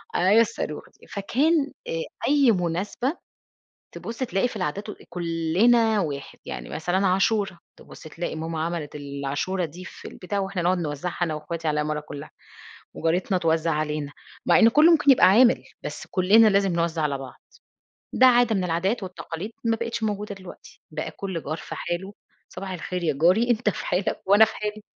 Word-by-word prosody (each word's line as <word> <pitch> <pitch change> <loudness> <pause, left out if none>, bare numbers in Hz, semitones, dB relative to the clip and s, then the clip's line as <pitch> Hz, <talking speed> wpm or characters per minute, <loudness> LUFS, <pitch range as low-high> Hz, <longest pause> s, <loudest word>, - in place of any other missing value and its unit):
أيوه 200 +5 +5
الصاروخ 155 -8 -3 0.2
دي - - -18
فكان 280 +9 +1 0.2
آآ 485 0 -2 0.3
أي 280 -4 +5
مُناسبة 200 - -1 0.7
تبُصّي 235 +3 -5
تلاقي 195 +1 0
في - - -10
العادات 200 +8 -3
وال - - -9
أ - - -16
كُلّنا 185 +7 +2
واحد 145 -6 -4
يعني 60 -1 -6
مثلًا، 180 +5 0
عاشورا 195 0 +1 0.2
تبُصّي 155 - -12
تلاقي 165 +1 -4
ماما 160 0 -4
عملِت 165 -3 -4
ال 140 -1 -6
عاشورا 175 +7 -1
دي 175 +4 -10
في - - -10
البتاع 195 +2 -4
وإحنا 195 -2 -2
نقعد 180 +2 +2
نوزّعها 165 +1 -4
أنا 165 -3 -1
واخواتي 165 +2 -5
على 150 - +1
العمارة 150 0 -2
كُلّها. 145 -1 -9 0.7
وجارتنا 180 +4 0
توزّع 165 -1 +1
عَلينا، 150 -1 -2 0.3
مع - - +5
إن 225 - +7
كُلّه 300 +8 +6
مُمكن 295 -3 +4
يبقى 265 - +7
عامل 235 +6 +5 0.2
بس - - -6
كُلّنا 205 +4 +5
لازم 195 -2 +2
نوزّع 170 -1 0
على 145 -2 0
بعض. 135 -1 -10 0.7
ده 260 - +6
عادة 245 -2 +5
من 185 - 0
العادات 185 +7 0
والتقاليد، 185 +1 -6
ما 230 -1 +2
بقتش 230 0 -4
موجودة 210 -1 -2
دلوقتي. 185 -2 -13
بقى 155 0 -4
كل 190 -5 -5
جار 155 +3 -3
في - - -8
حاله، 190 +4 -4 0.3
صباح 190 +1 -7
الخير 180 0 -4
يا 155 -3 +1
جاري 210 +8 +4
أنت 230 -2 +2
في - - -6
حالك 185 +2 -1
وأنا 205 +3 +7
في 220 - -7
حالي. 210 0 -4
185 Hz, 180 wpm, -25 LUFS, 165-220 Hz, 0.7 s, إن